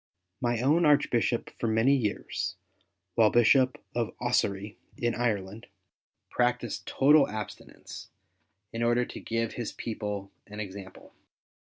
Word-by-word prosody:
My 120 -2 0
own 150 +7 +3
Archbishop, 130 -6 +2
for 115 - 0
many 115 +5 +3
years, 110 -6 -2 0.6
while 110 -2 +5
Bishop 130 +3 +4 0.2
of 120 -2 -2
Ossory, 105 -4 0 0.2
in 120 -1 0
Ireland, 110 -3 -2 0.6
practised 125 0 -1
total 145 +1 +5
abstinence, 105 -1 -8 0.7
in 115 - -3
order 120 +1 +2
to - - -9
give 115 0 -2
his 120 -3 -4
people 105 -3 -5 0.2
an 105 0 -9
example. 95 -2 -9
115 Hz, 115 wpm, -28 LUFS, 105-125 Hz, 0.7 s, while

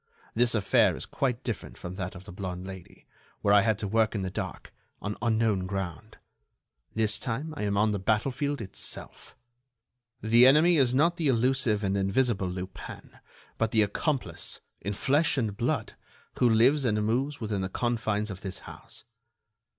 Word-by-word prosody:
This 120 0 +3
affair 100 -3 +3
is - - -6
quite 125 -2 -2
different 115 -5 -5
from 90 - -7
that 95 -1 -5
of 95 - -10
the 100 - -11
blonde 90 -1 -5
Lady, 95 -2 -11 0.4
where 100 - +3
I 105 - +7
had 110 -1 +1
to 105 - -3
work 110 +1 +2
in 100 - -1
the 95 - -3
dark, - - -6 0.3
on 105 0 -4
unknown 110 -5 +1
ground. 95 +2 -5 0.8
This 110 -1 +1
time 135 +6 -3
I - - -5
am 100 0 0
on 105 +1 +3
the 100 - -1
battlefield 130 +8 0
itself. 95 - -5 0.8
The 115 +3 +6
enemy 160 +5 +6
is 130 -3 +3
not 170 +5 +3
the 160 - 0
elusive 125 -3 +2
and 100 0 0
invisible 100 0 +1
Lupin, 90 +1 -8 0.4
but 110 - +2
the 110 -1 +3
accomplice, 130 +7 -2 0.2
in 100 - -3
flesh 145 +9 +2
and 110 -6 -1
blood, 120 +1 -1 0.5
who 125 - +5
lives 125 +6 +4
and 105 -4 +1
moves 135 +6 0
within 105 -4 -2
the 95 - -2
confines 110 -2 -1
of 95 - -8
this 95 -2 -5
house. - - -11
110 Hz, 170 wpm, -28 LUFS, 100-125 Hz, 0.8 s, I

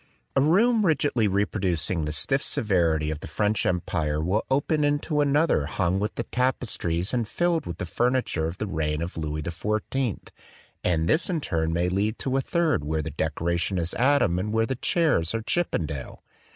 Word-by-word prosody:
A 135 - +4
room 215 - +4
rigidly 145 - +2
reproducing 95 -5 0
the 75 - -2
stiff 135 - +1
severity 85 - +1
of 75 - -4
the - - -8
French 105 0 0
Empire 80 -4 -1
will 90 +7 0
open 145 +3 +1
into 145 +1 +1
another 145 - +2
hung 95 +2 0
with 105 +1 -2
the 120 - -2
tapestries 110 -9 -1
and 120 -3 0
filled 175 +5 0
with 85 -1 -5
the - - -3
furniture 120 -5 0
of 85 +2 -6
the 110 - -3
reign 80 -4 -1
of 85 - -6
Louis 75 -1 -3
XIV; 105 - -2 0.5
and 80 -2 +1
this 160 - +2
in 175 -3 0
turn 80 - -1
may 85 +2 +1
lead 100 +4 0
into 130 +2 -2
a 135 - +2
third 165 - +1
where 80 +1 -1
the 80 - -5
decora 80 +3 -1
tion 95 +2 -1
is 85 0 -1
Adam 125 -9 +3
and 105 +3 -2
where 115 +1 +2
the 130 - -2
chairs 130 - +1
are 115 - -2
Chippen 175 - 0
dale. 70 -4 -7
100 Hz, 190 wpm, -25 LUFS, 80-135 Hz, 0.5 s, A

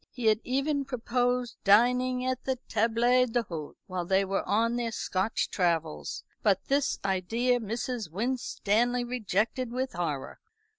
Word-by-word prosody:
He 245 -3 -6
had 215 -1 +4
even 275 +3 0
proposed 245 -1 -1
dining 250 +5 +4
at 255 0 -1
the 265 - +1
table 230 +1 +1 0.2
d'hôte, 205 -11 -3
while 185 -3 -3
they 190 +3 +2
were 195 +1 0
on 230 +3 +2
their 235 -1 -1
Scotch 195 0 -1
travels, 165 -4 -1 0.2
but 195 -3 +2
this 280 +1 +2
idea 225 +7 +1
Mrs. 230 -2 -3
Winstanley 240 +3 0
rejected 240 0 -1
with 255 +1 -2
horror. 155 -6 -3
230 Hz, 135 wpm, -29 LUFS, 195-250 Hz, 0.2 s, had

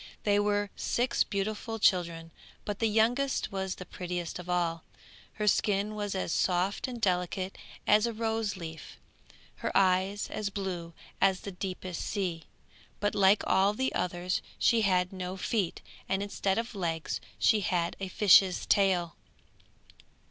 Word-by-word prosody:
They 205 -1 +3
were 205 -1 +1
six 245 +1 +1
beautiful 215 +3 -3
children, 170 -5 +1 0.3
but 205 -1 -4
the 225 - +2
youngest 240 +6 +1
was 190 -1 -3
the 185 - -9
prettiest 175 -1 -5
of 180 0 -9
all; 170 -2 0 0.5
her 210 - -3
skin 205 0 +2
was 205 -2 -3
as 185 - -2
soft 185 +6 +1
and 245 -2 -6
delicate 185 -1 -1 0.3
as 210 +2 +4
a - - -1
roseleaf, 215 -7 -4 0.6
her - - -3
eyes 190 +2 +2
as 210 -2 -2
blue 185 -4 -4 0.3
as 190 -1 +3
the 200 - -6
deepest 185 -1 -5
sea, 180 -6 -3 0.5
but 205 +1 0
like 200 +1 +4
all 195 +2 +3
the 260 +3 -1
others 180 0 -1 0.2
she 230 -1 +3
had 185 -2 +2
no 185 0 -5
feet, 190 -2 -1 0.3
and 195 +1 0
instead 200 -1 -1
of 230 +1 -2
legs 165 -5 -2 0.2
she 220 - +4
had 180 -4 0
a 195 - -3
fish's 190 -1 +5
tail. 185 -4 +2
195 Hz, 145 wpm, -30 LUFS, 180-210 Hz, 0.6 s, fish's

